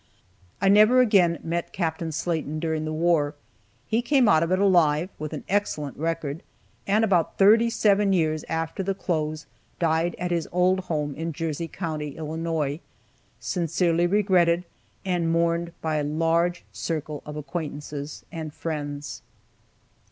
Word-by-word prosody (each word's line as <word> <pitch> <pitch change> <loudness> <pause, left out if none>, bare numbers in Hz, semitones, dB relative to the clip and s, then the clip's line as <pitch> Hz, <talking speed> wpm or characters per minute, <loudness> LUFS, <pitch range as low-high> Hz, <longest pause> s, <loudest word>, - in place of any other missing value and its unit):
I 195 - +1
never 215 +5 +6
again 195 -9 +4
met 170 +1 -3
Capt. 165 -3 -2
Slaten 160 -1 -2
during 160 -1 -1
the 155 - -3
war. 155 -2 +1 0.5
He 225 - +1
came 255 -1 +3
out 160 -6 +5
of 165 +1 0
it 185 - +3
alive, 175 -4 +3
with 155 0 -4
an - - -6
excellent 180 -8 -1
record, 160 -1 -3 0.5
and 210 +3 +3
about 180 -6 +1
thirty 225 +4 +6
seven 205 -3 +3
years 155 -4 +1
after 165 +3 -2
the 195 0 -1
close 155 -5 -2 0.3
died 165 +1 +1
at 180 0 -3
his 170 -2 0
old 180 +2 +3
home 150 -3 -1
in 165 +3 -4
Jersey 165 +1 -3
county, 155 -4 -5
Illinois, 160 -2 -2 0.6
sincerely 170 0 +1
regretted 180 -3 +3 0.4
and 175 -3 0
mourned 170 0 +1
by 160 -1 -1
a 150 - 0
large 165 +3 0
circle 155 -2 -4
of 150 - -8
acquaintances 150 -1 -6
and 155 -2 -6
friends. 145 -3 -5
165 Hz, 145 wpm, -25 LUFS, 155-180 Hz, 0.6 s, never